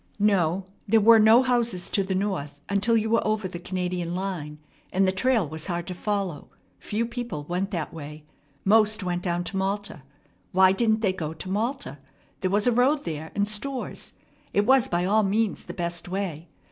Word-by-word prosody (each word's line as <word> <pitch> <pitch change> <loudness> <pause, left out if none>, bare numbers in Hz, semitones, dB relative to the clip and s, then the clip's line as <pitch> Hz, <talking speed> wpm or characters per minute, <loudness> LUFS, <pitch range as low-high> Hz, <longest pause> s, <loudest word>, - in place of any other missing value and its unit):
No, 190 -3 +2 0.2
there 225 +2 +5
were 225 +1 +7
no 220 +4 +7
houses 235 -7 +1
to 195 - +2
the 190 0 -2
north 185 -8 -2
until 200 +3 +2
you 220 0 0
were 230 +1 +2
over 215 -2 0
the 175 -1 -7
Canadian 180 -1 -3
line, 180 -6 -4 0.3
and 190 +1 +2
the - - +3
trail 220 -1 +1
was 155 +3 -6
hard 175 -2 -2
to 185 - -5
follow. 195 -4 -3 0.3
Few 220 +3 -2
people 235 -10 -5
went 180 +5 -2
that 170 -6 -4
way. 150 -1 -9 0.4
Most 215 +1 +4
went 175 -1 -2
down 175 -1 -1
to 190 +3 -4
Malta. 195 -4 -2 0.5
Why 190 0 +6
didn't 220 +2 +2
they 195 -4 +2
go 160 -4 -5
to 185 - -7
Malta? 225 - -2 0.4
There 185 - 0
was 205 +2 +1
a 245 - +4
road 260 +5 +2
there, 160 -1 -4
and 205 0 +1
stores. 250 +5 -4 0.4
It 205 - +2
was 265 0 +5
by 175 +1 0
all 215 +3 +3
means 210 +1 0
the - - -8
best 175 -1 -3
way. 180 -4 -4
195 Hz, 190 wpm, -25 LUFS, 175-220 Hz, 0.5 s, were